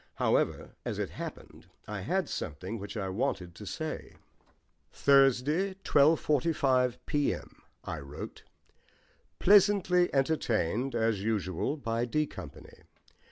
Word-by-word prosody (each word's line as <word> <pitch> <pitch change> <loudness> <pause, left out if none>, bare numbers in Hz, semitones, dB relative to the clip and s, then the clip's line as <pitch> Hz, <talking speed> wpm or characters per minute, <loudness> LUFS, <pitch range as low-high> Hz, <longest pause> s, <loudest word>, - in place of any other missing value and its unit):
However, - - +1
as - - -3
it - - -3
happened, - - -9 0.2
I 105 -1 -4
had 180 - 0
something 95 - -5
which 100 +3 -7
I 95 -2 -2
wanted 95 -4 -2
to 105 +3 -10
say. 160 - -5 0.8
"Thursday, 140 +7 +3
12.45 140 -4 +3
p.m.," 145 -2 -2 0.2
I - - -5
wrote. 70 +1 -8 1.0
"Pleasantly 195 -3 +4
entertained 130 - 0
as 110 -3 +1
usual 105 - -1
by 115 -3 -1
D 150 +6 0
Company. 90 - -11
125 Hz, 110 wpm, -30 LUFS, 105-155 Hz, 1.0 s, Pleasantly